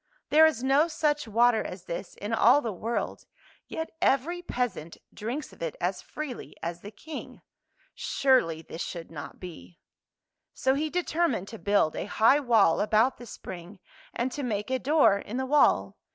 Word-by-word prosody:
There 315 +1 +7
is 255 -6 -2
no 275 +4 +4
such 300 -4 0
water 230 +1 +3
as 180 -1 -7
this 175 +1 -6
in 210 +3 -5
all 240 +5 +6
the 235 -6 -3
world, 225 +6 -4 0.4
yet 320 0 -5
every 320 +7 +1
peasant 245 - -3 0.2
drinks 240 +8 -5
of - - -18
it 165 -2 -3
as 180 +2 -1
freely 295 -5 -7
as 170 +1 -4
the 205 - -8
King. 310 +9 -9 0.5
Surely 240 - +1
this 160 - -8
should 170 -2 -6
not 145 -3 -8
be! 90 - -10 0.4
" - - -62 0.3
So 265 - +2
he 305 +3 -1
determined 330 - 0
to 225 - -9
build 200 -6 +2
a - - -3
high 225 +7 +4
wall 225 - +4
about 220 +5 +3
the 240 - -10
spring, 185 -1 -9 0.3
and 250 +2 -2
to 290 - -4
make 215 -3 -2
a 260 - +1
door 285 -9 +4
in 215 +4 -6
the 260 - -1
wall. 290 +2 +3
235 Hz, 175 wpm, -28 LUFS, 195-285 Hz, 0.5 s, There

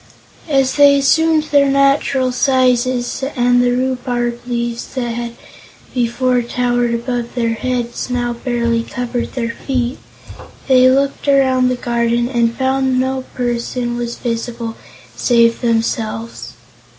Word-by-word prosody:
As 270 -2 +1
they 285 -1 +6
assumed 315 +3 +3
their 280 -1 +4
natural 275 -1 +2
sizes 250 0 +1
and 245 -1 +3
the 245 - +2
rhubarb 245 -1 -1
leaves 235 0 -3
that 240 -2 -2
had 235 0 -4 0.6
before 250 +1 +1
towered 240 0 0
above 240 0 -4
their 230 -2 0
heads 240 +1 -3
now 245 -1 -1
barely 235 -1 -1
covered 245 0 -4
their 230 -3 -2
feet, 250 +1 -3 0.7
they 255 -1 +6
looked 275 +2 0
around 260 -2 +3
the 255 - 0
garden 235 0 0
and 235 -2 0
found 265 0 +1
that 260 -1 +1
no 260 0 -1
person 240 0 -2
was 240 0 -4
visible 230 -1 -4 0.4
save 235 -1 +2
themselves. 125 - -2
245 Hz, 125 wpm, -17 LUFS, 235-260 Hz, 0.7 s, they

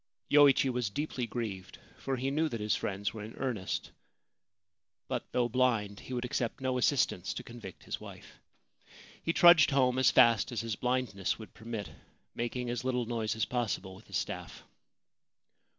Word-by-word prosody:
Yoichi 145 -2 +6
was 125 -4 -1
deeply 130 0 -3
grieved, 105 -5 -5 0.2
for 135 - -3
he 135 +2 -1
knew 155 +2 +1
that 115 - -4
his 105 0 +1
friends 100 0 -2
were 110 - -7
in 110 - -9
earnest; 120 -8 -3 1.2
but, - - -4
though 125 -1 +2
blind, 115 -5 +1
he - - -11
would 125 0 -2
accept 120 -1 -2
no 130 -1 0
assistance 125 -9 +1
to - - -5
convict 115 -6 -10
his - - -5
wife. - - -12 0.8
He 165 - 0
trudged 170 -3 +7
home 130 -2 +3
as 130 - +6
fast 115 +1 +5
as 120 - -2
his 115 -2 -3
blindness 125 -6 -1
would 110 -4 -11
permit, 110 -2 -6 0.4
making 120 +1 -3
as 120 - -3
little 125 -2 0
noise 110 -2 -2
as 110 - 0
possible 100 -6 -2
with 95 - -15
his - - -2
staff. - - -5
120 Hz, 165 wpm, -31 LUFS, 110-130 Hz, 1.2 s, trudged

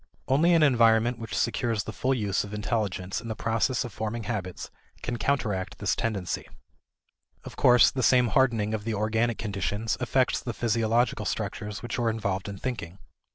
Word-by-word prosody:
Only 165 +6 +4
an 165 - +5
environment 115 -3 +4
which 115 -2 -5
secures 115 -2 0
the - - -7
full 130 +1 0
use 105 -4 0
of 105 0 -7
intelligence 105 -4 -2
in - - -9
the 110 - -3
process 115 +3 0
of 120 - -7
forming 110 +1 -3
habits 95 -6 -5 0.3
can 120 0 -2
counteract 105 -7 -1
this 105 - 0
tendency. 100 -6 -2 1.0
Of - - -10
course, 125 -1 +6
the 130 - -2
same 125 0 +4
hardening 115 -5 +2
of 110 -2 -2
the 115 0 -2
organic 110 +2 0
conditions 105 +1 -2
affects 125 +1 +1
the 120 - -4
physiological 115 +1 +1
structures 105 +1 -4
which 120 - -3
are 115 -1 +2
involved 100 -4 -2
in 100 - -6
thinking. 95 -8 -5
115 Hz, 170 wpm, -27 LUFS, 105-120 Hz, 1.0 s, course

